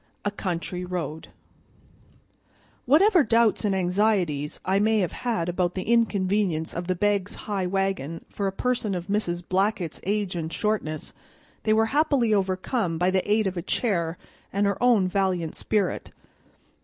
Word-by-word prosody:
A 205 - +1
Country 180 -2 -3
Road 165 -4 -4 1.6
WHATEVER 345 - +5
DOUBTS 230 -2 +3
and 200 -2 +1
anxieties 180 -6 +1
I 190 +1 +2
may 220 +1 +3
have 185 -5 +1
had 225 -9 -2
about 175 0 0
the 185 - -2
inconvenience 200 -7 +1
of 175 +1 -4
the 185 - +1
Begg's 200 +1 0
high 195 -3 -1
wagon 190 -5 -2
for 200 - -3
a - - 0
person 225 -1 -1
of 175 -1 -4
Mrs. 175 -4 -2
Blackett's 190 -3 0
age 200 -2 -1
and 165 -1 -3
shortness, 185 -7 -2 0.5
they 215 - +4
were 220 +1 +4
happily 280 -7 +3
overcome 190 -1 0
by 180 +2 +2
the 190 +2 0
aid 215 0 +3
of 190 -1 -2
a - - -1
chair 170 -4 -1 0.3
and 200 +1 +1
her 200 -1 -1
own 235 -7 +4
valiant 185 -4 0
spirit. 205 -3 -1
195 Hz, 155 wpm, -25 LUFS, 175-215 Hz, 1.6 s, WHATEVER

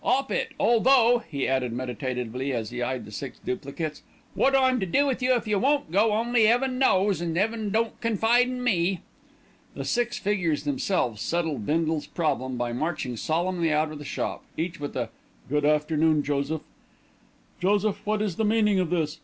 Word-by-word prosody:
"'Op 270 +1 +1
it, - - -1
although," 240 0 +4
he 140 -3 -2
added 130 -2 0
meditatively 125 +1 -3
as 115 -4 -3
he 125 0 -4
eyed 125 +1 -2
the 105 - -11
six 130 +5 -6
duplicates, 145 +4 -4 0.3
"wot 270 0 +3
I'm 260 -1 +3
to 190 - -2
do 285 +11 +3
with 265 -2 -1
you 255 0 +3
if 235 - -2
you 210 -2 +1
won't 275 - +1
go, 210 +4 +3
only 230 0 +3
'Eaven 255 +2 +2
knows, 195 - +3
an' 170 -1 -2
'Eaven 215 +2 0
don't 225 +2 -1
confide 230 +2 +3
in 250 0 -4
me." 185 -5 +1 0.7
The - - -5
six 240 0 0
figures 180 -8 0
themselves 135 - -1
settled 160 -10 -2
Bindle's 160 -1 0
problem 130 -6 -1
by 120 -1 -2
marching 150 -2 -2
solemnly 170 +5 0
out 155 +1 +1
of 155 - -8
the - - -8
shop, 145 - -3
each 170 +1 -3
with 145 0 -5
a - - -2 0.4
"Good 150 +1 0
afternoon, 150 0 +2
Joseph." 145 +2 -1 1.0
"Joseph, 205 +2 +1
what 215 0 0
is 195 -6 -3
the 220 - +1
meaning 210 -2 +3
of 180 -3 0
this?" 160 -2 -1
170 Hz, 180 wpm, -26 LUFS, 145-225 Hz, 1.0 s, although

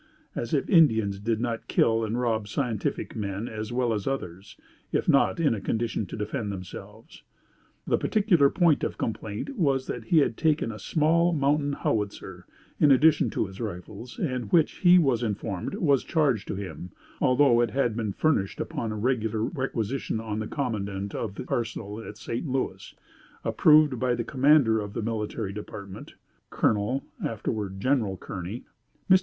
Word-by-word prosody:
as 120 - -4
if 145 - +1
Indians 110 - +4
did 110 +1 -1
not 115 -1 -3
kill 115 0 +2
and 110 +2 -2
rob 115 -4 0
scientific 115 -1 -2
men 100 +1 -3
as 110 -1 -5
well 120 -1 +1
as 105 -2 -3
others 100 -8 -5 0.3
if - - 0
not 140 - +3
in 155 -7 +3
a 105 - -4
condition 110 -1 -2
to - - -7
defend 105 0 -3
themselves. 95 -2 -10 0.6
The - - +1
particular 190 -10 +3
point 170 -3 +3
of - - -2
complaint 110 - -4
was 135 -5 +2
that 115 -2 -5
he 165 - +2
had 125 -7 +3
taken 155 -7 +1
a 105 - -8
small 165 +3 +2
mountain 145 -1 +1
howitzer, 100 -7 -3 0.3
in 150 - +5
addition 150 +3 +5
to - - -1
his 95 +3 -9
rifles; 110 +4 -7
and 130 - -3
which 165 -3 +3
he 180 -1 +6
was 135 -9 +3
informed, 105 -4 -3
was 140 -5 +2
charged 140 - +1
to - - -3
him, 95 -2 -7 0.3
although 125 -2 +4
it 120 - +1
had 120 -4 0
been 110 -3 -2
furnished 100 -5 0
upon 115 - -3
a - - -3
regular 110 -2 0
requisition 130 - -2
on 110 -1 -4
the 110 - -3
commandant 100 -7 -3
of 100 -4 -4
the - - -6
arsenal 110 -2 -3
at 105 - -9
St. 115 +6 -4
Louis, 130 0 -3 0.5
approved 150 -5 +4
by 125 0 +1
the 115 - -2
commander 130 -3 +4
of 100 -1 -5
the - - -3
military 110 -2 -3
department 100 -2 -9 0.3
(Colonel, 110 +6 0 0.2
afterward 105 -3 -3
General 110 -5 +1
Kearney). 95 +7 -6 0.4
Mr. 185 0 +7
115 Hz, 165 wpm, -26 LUFS, 105-140 Hz, 0.6 s, Mr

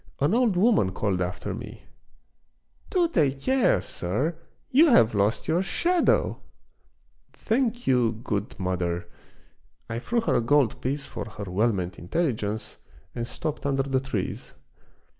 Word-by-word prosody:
An 145 +7 +2
old 235 -6 +3
woman 185 - +3
called 95 -4 -1
after 90 0 -3
me: - - -9 0.3
— - - -45
" - - -36
Do 355 -3 +2
take 140 - +1
care, 260 - +2
sir, 130 - -2 0.4
you 300 +6 +6
have 115 - +5
lost 105 +2 +1
your 170 +3 +2
shadow! 345 - +1 0.3
" - - -41
" - - -41
Thank 240 0 -1
you, 125 -3 +3
good 105 -4 -3
mother! 90 -2 -2 0.4
" - - -39
I 115 - -2
threw 235 - 0
her 230 - 0
a - - +3
gold 135 +1 +2
piece 140 +2 -2
for - - -6
her 105 -1 -8
well 100 +5 +1
meant 90 -3 -4
intelligence 110 - -2 0.4
and 120 -1 -4
stopped 155 +3 -4
under 135 -1 +1
the 135 -1 0
trees. 130 -8 -4
130 Hz, 160 wpm, -26 LUFS, -, 0.4 s, you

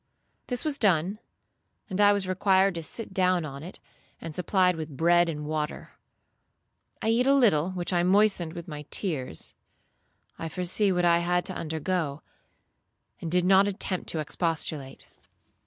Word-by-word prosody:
This 245 +2 -2
was 295 -2 0
done, 190 0 +1 0.7
and 195 0 -1
I 205 0 +7
was 200 -2 -1
required 190 +1 +3
to 170 - -4
sit 205 +5 -4
down 185 -3 +2
on 140 -1 -8
it, 175 +4 -10 0.4
and 165 -2 -7
supplied 180 +1 +2
with 155 -4 -7
bread 175 +1 +4
and 150 -2 -5
water. 150 0 -4 1.1
I 220 - +1
eat 240 +3 +2
a 275 - +5
little, 185 - +3
which 180 0 -3
I 175 - +3
moistened 185 -3 +2
with 170 -1 -8
my 150 -2 -8
tears. 140 - -1 0.9
I 165 - -4
foresaw 185 +3 +1
what 175 0 +1
I 170 0 +4
had 175 +1 0
to 190 - -5
undergo, 160 -2 -3 1.0
and 165 - -5
did 180 0 +2
not 195 +1 +5
attempt 190 -2 -3
to 160 - -1
expostulate. 155 -3 -3
180 Hz, 155 wpm, -27 LUFS, 160-195 Hz, 1.1 s, I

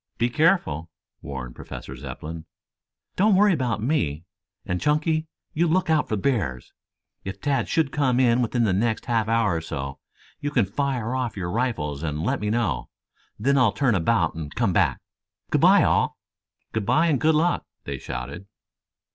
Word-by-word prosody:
"Be 120 +1 +1
careful," 150 - +2 0.3
warned 65 -3 -6
Professor 65 - -8
Zepplin. 75 +5 -7 0.7
"Don't 205 +1 +4
worry 205 0 +5
about 120 -8 -1
me, 85 - 0 0.4
and, 90 0 -2
Chunky, 155 +1 +1 0.3
you 170 +3 +2
look 170 0 +2
out 155 -2 +2
for 110 - 0
bears. 95 - -1 0.5
If 95 - -6
Tad 135 -5 0
should 155 -4 +1
come 130 -4 +1
in 125 -1 +4
within 120 0 +1
the 105 -4 +2
next 110 +3 0
half 115 -3 +1
hour 115 -5 +2
or - - -3
so, 70 -4 -5 0.4
you 145 - -2
can 125 -8 +2
fire 125 +2 -2
off 125 -5 -2
your 90 -2 -3
rifles 85 - -1
to 80 -2 -2
let 75 +2 -1
me 105 - -2
know. 105 - -1 0.5
Then 135 +6 +2
I'll 120 -5 +4
turn 125 +3 +2
about 90 -1 +2
and 80 -3 -7
come 115 -6 +1
back. - - +2 0.5
Good - - +2
bye, - - +7
all." - - +2 0.6
"Good 110 -3 -2
bye 160 +2 +4
and 150 -6 +1
good 160 0 +4
luck," 170 +3 +2 0.2
they 70 -2 -5
shouted. 95 +3 -6
115 Hz, 170 wpm, -24 LUFS, 85-140 Hz, 0.7 s, bye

